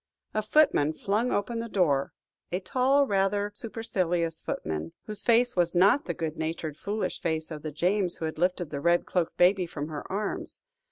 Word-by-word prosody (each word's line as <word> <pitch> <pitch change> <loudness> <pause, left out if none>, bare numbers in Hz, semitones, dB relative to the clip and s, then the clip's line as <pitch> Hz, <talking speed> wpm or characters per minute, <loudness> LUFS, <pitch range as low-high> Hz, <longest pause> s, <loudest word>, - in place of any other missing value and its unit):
A 215 - +1
footman 215 - +3
flung 215 +9 0
open 230 +3 -1
the 230 0 -4
door 150 -10 +2 0.4
a 180 - 0
tall, 260 +8 +3
rather 200 -1 +1
supercilious 180 -7 -2
footman, 80 +1 -4
whose 210 -1 -4
face 240 +1 +3
was 175 -1 +2
not 200 +11 +5
the 170 - -3
good 160 -1 -3
natured, 160 -1 -3
foolish 205 +6 -3
face 160 -1 -2
of 155 -1 -6
the 155 0 -5
James 180 +4 +1
who 160 - -4
had 155 0 -4
lifted 180 -2 0
the 140 -2 -4
red 170 +2 +3
cloaked 175 -3 -1
baby 180 0 +4
from 150 -1 -5
her 150 +2 -7
arms. 205 +2 -4
180 Hz, 180 wpm, -28 LUFS, 160-210 Hz, 0.4 s, not